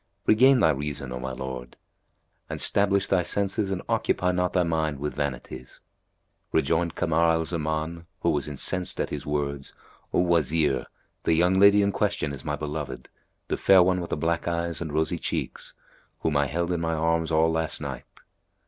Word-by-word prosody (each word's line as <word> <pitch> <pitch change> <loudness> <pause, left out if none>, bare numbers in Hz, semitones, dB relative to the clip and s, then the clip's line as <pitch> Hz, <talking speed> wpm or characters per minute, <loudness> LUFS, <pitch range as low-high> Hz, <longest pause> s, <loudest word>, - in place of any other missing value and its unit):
Regain 130 +4 +5
thy - - +5
reason, 70 -1 -4
O 65 - -4
my 65 +1 -4
lord, 65 -2 -7 0.7
and - - -4
stablish 100 -1 +4
thy 95 -2 +2
senses 100 +3 -1
and 95 -2 -3
occupy 90 0 +1
not 90 0 0
thy 90 - +3
mind 80 -3 -1
with 75 +2 -4
vanities." 65 -3 -5 0.7
Rejoined 85 +3 +1
Kamar 80 0 +2
al 80 0 0
Zaman 80 +1 -3
who 85 - +2
was 75 -2 -1
incensed 90 +5 0
at - - -1
his - - -5
words, 70 -1 -3 0.4
"O - - +2
Wazir, 80 -5 +1 0.4
the 80 - +2
young 90 +3 +3
lady 100 +1 +6
in 100 - +1
question 90 -8 -1
is 70 - -8
my 75 -1 -2
beloved, 75 -3 -5 0.4
the - - -1
fair 95 -2 +6
one 90 0 +1
with 85 - -6
the - - -2
black 85 +1 -1
eyes 85 -1 -2
and 80 -3 -4
rosy 80 +3 0
cheeks, - - -4 0.5
whom 80 -2 0
I 70 0 +2
held 85 +4 -2
in 85 -2 -1
my 80 0 -1
arms 80 0 0
all 80 0 +3
last 80 -1 -2
night." - - -6
80 Hz, 180 wpm, -26 LUFS, 75-90 Hz, 0.7 s, lady